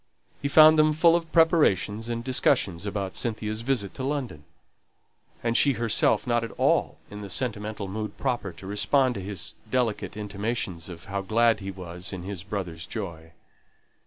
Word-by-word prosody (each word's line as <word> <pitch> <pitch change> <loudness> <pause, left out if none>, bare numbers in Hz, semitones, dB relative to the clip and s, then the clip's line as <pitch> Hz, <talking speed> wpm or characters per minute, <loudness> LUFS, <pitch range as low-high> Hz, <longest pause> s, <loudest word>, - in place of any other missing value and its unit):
He 140 - 0
found 155 +2 +7
them 155 0 +5
full 165 +2 +5
of 165 -2 -2
preparations 120 - +3
and 115 0 -3
discussions 105 -7 +1
about 100 -2 -3
Cynthia's 110 -1 -2
visit 115 -6 -1
to 130 - -6
London; 130 - -3 1.0
and 115 0 0
she 140 +2 +5
herself 115 +2 +2
not 120 -1 +1
at 115 - -4
all - - +1
in 105 0 -7
the 100 - -7
sentimental 105 -2 -3
mood 105 +2 -5
proper 120 -8 -2
to 95 - -13
respond 125 +6 +2
to 100 - -5
his 95 -1 -5 0.2
delicate 120 -5 -1
intimations 100 -4 -3
of 85 -2 -10
how 100 0 -3
glad 115 +3 +2
he 100 -1 -6
was 90 -1 -7
in 90 -2 -6
his 95 -2 -6
brother's 90 -4 -5
joy. 85 -7 -7
105 Hz, 165 wpm, -26 LUFS, 95-125 Hz, 1.0 s, found